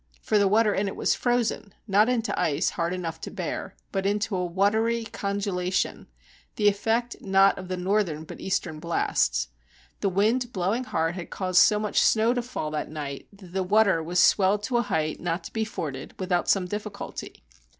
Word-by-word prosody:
For 210 - +1
the 200 - +4
water 215 +1 +3
in 200 +1 0
it 195 - -4
was - - +1
frozen, 240 -4 -1
not 210 +3 +4
into 235 -2 0
ice 145 -3 +1
hard 170 0 -1
enough 170 -3 -4
to - - -5
bear, - - -5 0.2
but 195 -1 -1
into 205 +1 0
a 180 - 0
watery 220 +6 +1
congelation, 200 -4 -2 0.5
the 210 - +2
effect 225 +4 +1
not 195 0 +4
of 185 - -8
the 185 0 -3
northern 180 -4 0
but - - -10
eastern 175 -5 -2
blasts. 155 - 0 0.5
The 200 - +1
wind 225 +6 +1
blowing 200 +6 -1
hard 165 -7 0
had 175 -1 -7
caused 185 -1 +2
so 210 - +5
much 210 0 +1
snow 225 +2 +4
to 245 - -1
fall 235 -11 -4
that 155 -1 -3
night 145 -3 -6
that 195 -3 -15
the 190 - 0
water 195 -2 +3
was 175 +3 -1
swelled 200 +3 +4
to 245 +2 0
a - - +3
height 155 -8 -1
not 170 0 -2
to - - -9
be 220 -1 0
forded 145 -10 -6
without 180 -2 0
some 195 -2 +3
difficulty. 205 +1 -6
195 Hz, 190 wpm, -26 LUFS, 175-215 Hz, 0.5 s, so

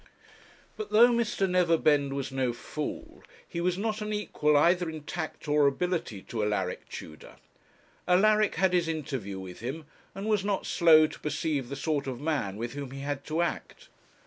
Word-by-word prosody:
But 430 - -5
though 235 +3 +7
Mr. 230 -5 +1
Neverbend 160 -6 +3
was 135 -1 -3
no 130 -2 0
fool, 150 +5 -6 0.3
he 170 - -4
was 180 0 0
not 215 +1 -2
an 210 0 -3
equal 150 -8 +1
either 175 +3 +3
in 155 -2 -7
tact 160 0 -5
or 150 -1 +4
ability 140 - -2
to 110 -3 -3
Alaric 100 -3 -2
Tudor. 80 0 -10 0.7
Alaric 210 +3 +4
had 185 +1 +2
his 175 -2 +2
interview 135 -11 -4
with 95 -1 -9
him, 135 +7 -5 0.3
and 195 - -5
was 210 -3 +1
not 200 -1 -1
slow 160 -3 +6
to 155 - -7
perceive 145 -3 -2
the 140 - -4
sort 145 -1 -1
of 125 -2 -4
man 145 -10 -1
with 115 +2 -4
whom 140 -2 -5
he 135 +1 -8
had 140 0 -3
to 160 +2 0
act. - - -5
155 Hz, 175 wpm, -28 LUFS, 135-180 Hz, 0.7 s, though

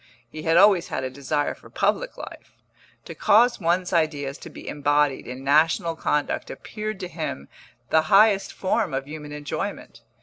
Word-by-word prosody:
He 155 - -7
had 165 +1 +2
always 195 -3 +5
had - - -3
a 130 - -3
desire 140 +2 -2
for - - -17
public - - -1
life; - - -10 0.5
to - - -8
cause 235 +3 +4
one's 180 +1 0
ideas 150 -4 0
to - - -10
be - - -12
embodied 145 -1 +1
in 125 +2 -7
national 155 +3 +2
conduct 150 -2 -1
appeared 215 -2 -6
to 180 - -4
him 155 - -6 0.4
the 160 - +5
highest 200 0 +5
form 190 -5 -1
of 135 0 -3
human 150 -1 -8
enjoyment. 145 -2 -5
155 Hz, 165 wpm, -24 LUFS, 145-185 Hz, 0.5 s, always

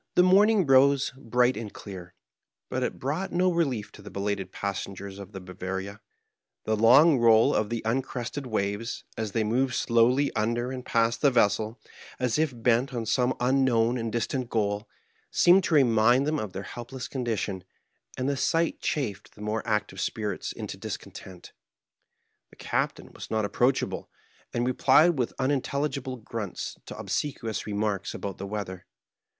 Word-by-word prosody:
The 180 - +6
morning 200 +2 +5
rose 135 0 +4
hright 125 0 +1
and 110 -2 -6
clear, 90 -3 -10 0.6
hut - - -1
it - - -1
hrought 160 +9 -2
no 180 +1 +2
relief 135 -11 -1
to - - -14
the - - -10
helated 100 -1 -3
passengers 100 0 -5
of 100 0 -9
the 95 - -7
Bavaria, 95 +2 -6 0.6
The 110 - 0
long 130 +7 +6
roll 115 -1 +5
of 105 -1 0
the 115 -1 -3
un* 120 +4 +1
crested 130 +1 -5
waves, 105 0 -2
as 110 -3 -4
they 110 - +1
moved 120 +4 +1
slowly 125 +4 +2
under 120 +3 0
and 130 -1 -5
past 115 -1 +1
the 145 - +6
vessel, 110 -2 +1 0.4
as 125 +2 0
if 155 -2 +2
hent 125 +2 +2
on 115 -1 -2
some 125 +3 +1
unknown 125 -2 +2
and 115 -1 -3
distant 120 +2 -2
goal, 105 -1 -1 0.4
seemed 180 +2 +5
to 165 - +1
remind 120 -1 +4
them 155 0 0
of 105 -5 -5
their 95 - -5
helpless 125 +4 -7
condition, 110 -7 -3 0.5
and 130 - -1
the 140 - +1
sight 165 +5 +1
chafed 125 -10 -3
the 105 - -13
more 105 +1 -1
active 105 -2 -1
spirits - - -3
into - - -6
discontent. 90 -2 -8 1.0
The - - -19
Captain - - -2
was - - -9
not 110 -1 0
approachahle, 120 +6 0 0.4
and 120 0 -1
replied 140 +5 +4
with 120 - -1
unintelligihle 135 -2 -1
grunts 110 -5 -5
to - - -7
ohseqaious 115 -8 -3
remarks 105 -2 -2
ahout 100 -2 -6
the 100 - -5
weather. 100 -3 -5
115 Hz, 160 wpm, -27 LUFS, 105-135 Hz, 1.0 s, The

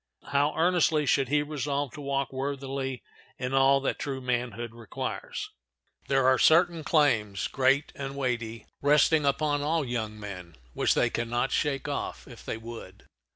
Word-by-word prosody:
How 145 +2 +2
earnestly 165 -3 +3
should 135 -1 +2
he 145 +1 +2
resolve 145 -2 -2
to 150 - -9
walk 140 -1 -2
worthily 135 -1 -3 0.3
in 125 +1 -3
all 135 +1 +5
that 135 - -1
true 135 -2 -3
manhood 120 -2 -2
requires! 115 -3 -5 0.6
There 135 -1 +2
are 130 -1 +4
certain 170 0 +4
claims, 110 - +2
great 135 +2 +2
and 135 0 -6
weighty, 120 -4 -3 0.2
resting 150 +1 +4
upon 145 +1 +1
all 155 +1 0
young 110 -3 -3
men 90 -5 -8 0.2
which - - +2
they - - +2
can 120 -1 -2
not 120 +2 0
shake 140 -2 0
off 145 - -4
if 120 -3 -12
they - - -4
would. 115 +1 -10
135 Hz, 155 wpm, -28 LUFS, 120-145 Hz, 0.6 s, all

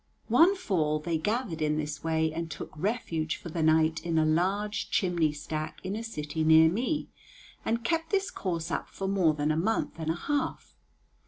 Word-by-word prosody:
One 330 - +6
fall 165 - 0
they 160 +1 -2
gathered 205 -2 -2
in 150 0 +1
this 150 -1 -4
way 160 -1 +1
and 165 0 -4
took 150 - -7
refuge 165 -4 -1
for 170 - -9
the 165 +1 -3
night 160 0 +3
in 165 -1 0
a 155 - +4
large 195 +7 0
chimney 170 -5 +2
stack 155 +1 -5
in 190 +2 -2
a 225 - -4
city 155 -7 -3
near 160 +1 +7
me, 255 - -1 0.5
and 230 +1 -1
kept 325 +4 0
this 390 0 0
course 170 -3 -3
up - - -2
for 195 - -4
more 185 -6 +3
than 150 +1 0
a - - +1
month 185 +1 -1
and 160 -1 -3
a 165 - +1
half. 290 +11 -3
165 Hz, 190 wpm, -29 LUFS, 155-210 Hz, 0.5 s, near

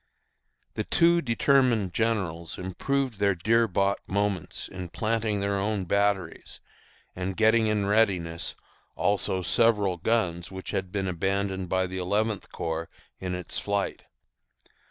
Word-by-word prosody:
The - - -2
two 170 +1 +4
determined 120 - +2
generals 95 -8 -1
improved 125 +6 -2
these 100 -1 +3
dear 115 +1 +4
bought 100 0 +1
moments 100 -3 -1
in 90 -2 -7
planting 110 +2 -1
their 100 0 0
own 100 -1 -1
batteries, 100 -2 -1 0.6
and 95 +1 -3
getting 110 0 +4
in 105 -2 +1
readiness 95 -6 +1 0.4
also 95 -2 0
several 105 -4 +3
guns 85 -4 0
which 95 0 -6
had 95 -1 -2
been 95 -1 -1
abandoned 95 +1 -1
by 95 0 +1
the 95 0 -5
Eleventh 105 +3 -1
Corps 80 0 -3 0.3
in 90 -1 -3
its 90 -1 -5
flight. 100 -1 -2
100 Hz, 130 wpm, -27 LUFS, 90-110 Hz, 0.6 s, two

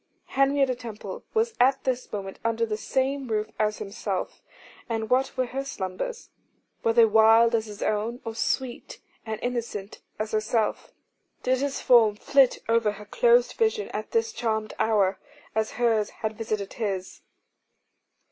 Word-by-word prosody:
Henrietta 275 -1 +3
Temple 220 -5 -8
was 450 +1 +2
at 265 +2 +4
this 255 -1 -2
moment 195 -2 -5
under 230 0 +1
the 215 -1 -2
same 265 +4 -1
roof 215 -1 -1
as 210 -1 +1
himself: 200 -2 -4 0.5
and 225 -1 -2
what 265 +2 +2
were 255 - +2
her 265 +3 -4
slumbers? 275 - -5 0.5
Were 225 - +3
they 230 0 +7
wild 225 +2 +6
as 225 -1 +1
his 210 -1 -6
own, 220 +3 -1
or 225 - -4
sweet 260 - -2 0.3
and 220 -1 -3
innocent 235 -5 -4 0.2
as 215 0 -3
herself? 215 0 0 0.5
Did 255 0 +2
his 280 0 -2
form 225 -4 +5
flit 270 +4 +3
over 230 -2 +2
her 210 +1 -11
closed 480 - +3
vision 445 -1 +1
at - - -5
this 455 -1 0
charmed 220 - -2
hour, 205 -3 +2 0.3
as 220 0 -1
hers 225 -3 +1
had 220 0 -4
visited 215 -3 -3
his? 195 -5 -4
230 Hz, 150 wpm, -26 LUFS, 215-260 Hz, 0.5 s, they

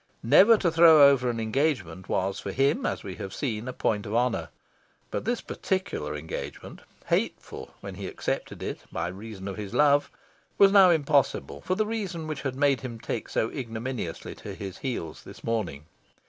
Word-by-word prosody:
Never 225 +3 +7
to 175 -5 +1
throw 160 -3 +8
over 125 -3 +1
an 115 -1 -2
engagement 110 - -1
was 95 +1 0
for 100 - -5
him, 135 +6 +1
as - - -3
we 95 -3 -7
have 95 - -6
seen, 115 -4 -3
a - - -2
point 105 -4 -1
of 105 - -3
honour. 120 0 +1 0.6
But - - -3
this 240 +1 0
particular 185 - -3
engagement 75 +2 -7 0.2
hateful, - - -2
when - - -7
he - - -6
accepted - - -4
it, - - -4
by 85 +1 -2
reason 100 +1 -8
of 95 - -5
his 105 -2 -6
love 145 -1 +4 0.5
was 195 -1 +7
now 195 -2 +8
impossible 145 - +1
for 185 - -1
the 215 - +1
reason 200 -7 -3
which 155 -1 -4
had 135 -2 -3
made 140 -3 +2
him 120 -2 -6
take 115 0 -4
so 110 - 0
ignominiously 115 - -5
to - - -8
his 95 -2 -7
heels 100 - -4
this - - -12
morning. 90 -11 -2
125 Hz, 180 wpm, -27 LUFS, 100-155 Hz, 0.6 s, throw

